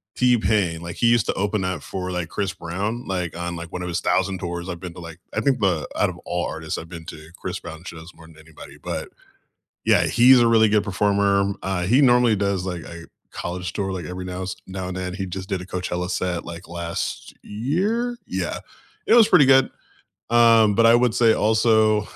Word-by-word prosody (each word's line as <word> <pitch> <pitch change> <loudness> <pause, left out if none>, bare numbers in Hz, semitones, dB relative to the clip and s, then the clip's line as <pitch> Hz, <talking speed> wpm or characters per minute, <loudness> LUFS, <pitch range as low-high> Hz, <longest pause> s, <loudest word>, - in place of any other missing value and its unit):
T-Pain. 105 -8 +2
Like, 85 0 -7
he 120 - +2
used 115 -1 +3
to - - 0
open 100 0 -1
up 90 -5 -3
for, 90 +5 -5
like, 85 -2 -3
Chris 100 -2 -2
Brown, 100 +8 -4
like, 90 -3 -3
on, 85 0 -4
like, 85 0 -8
one 90 - -5
of 90 - -4
his 85 0 -1
1,000 95 +1 0
tours 85 0 -5
I've 85 -2 -5
been 90 -2 -8
to, 90 - -10
like 85 0 -10
I - - -1
think 135 -3 +1
the 90 -7 0
out - - +2
of - - -8
all 90 0 -3
artists, 80 0 -5
I've 80 - -8
been 85 -2 -9
to 80 0 -10
Chris 90 - -5
Brown 80 0 -10
shows 85 -1 -10
more 80 - -15
than 80 -1 -17
anybody, 80 -1 -14
but - - -5 0.8
yeah, - - +4
he's 125 +1 +6
a 120 - +4
really 110 -1 +5
good 105 0 +2
performer, 100 0 +1
uh, 95 -2 -2
he 120 +10 +4
normally 120 -4 +4
does, 100 -2 -1
like, 90 -3 -4
a 85 -1 -10 0.3
college 90 0 -5
tour 95 -1 -3
like 90 -4 -5
every 90 0 -6
nows 90 0 -5
now 95 -1 -5
and 90 - -5
then, 90 0 -4
he 95 0 -4
just 95 +1 -6
did 95 -2 -2
a - - -10
Coachella 90 -1 -3
set, 90 -1 -2
like, 85 +1 -9
last 85 -1 -5
year? 195 - -1
Yeah, - - -3 0.5
it - - +5
was 235 -3 +7
pretty 155 -7 +6
good. 135 -1 +5 0.6
Um, 115 -3 +5
but 115 +2 +4
I 115 - +7
would 120 -2 +3
say 115 -2 +5
also 110 -1 +3
95 Hz, 215 wpm, -22 LUFS, 85-110 Hz, 0.8 s, was